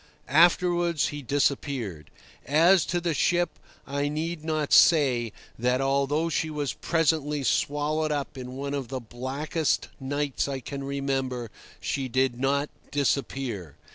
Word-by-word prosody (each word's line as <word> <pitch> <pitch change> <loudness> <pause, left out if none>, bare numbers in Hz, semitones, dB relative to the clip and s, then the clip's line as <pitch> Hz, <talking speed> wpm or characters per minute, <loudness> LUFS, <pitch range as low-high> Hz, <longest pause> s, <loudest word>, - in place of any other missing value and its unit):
Afterwards 175 +1 +3
he 145 0 -6
disappeared. 130 - -1 0.4
As 170 +6 +5
to 175 - 0
the 170 -1 -1
ship, 175 +4 +1 0.3
I 140 +1 -1
need 155 +2 -3
not 155 -2 -1
say 130 -8 +5 0.3
that, 125 +2 +2
although 140 +4 +1
she 160 -1 -1
was 150 -2 -2
presently 150 -3 0
swallowed 150 +3 0
up 145 -2 -3
in 125 -1 -7
one 140 +1 -3
of 140 -3 -3
the 130 +1 -4
blackest 135 +7 -2
nights 140 +1 -1
I 135 -1 -3
can 140 +2 -6
remember, 135 -4 -2 0.3
she 135 -1 -2
did 130 0 0
not 140 +2 +1 0.2
disappear. 135 - -2
140 Hz, 135 wpm, -27 LUFS, 130-155 Hz, 0.4 s, As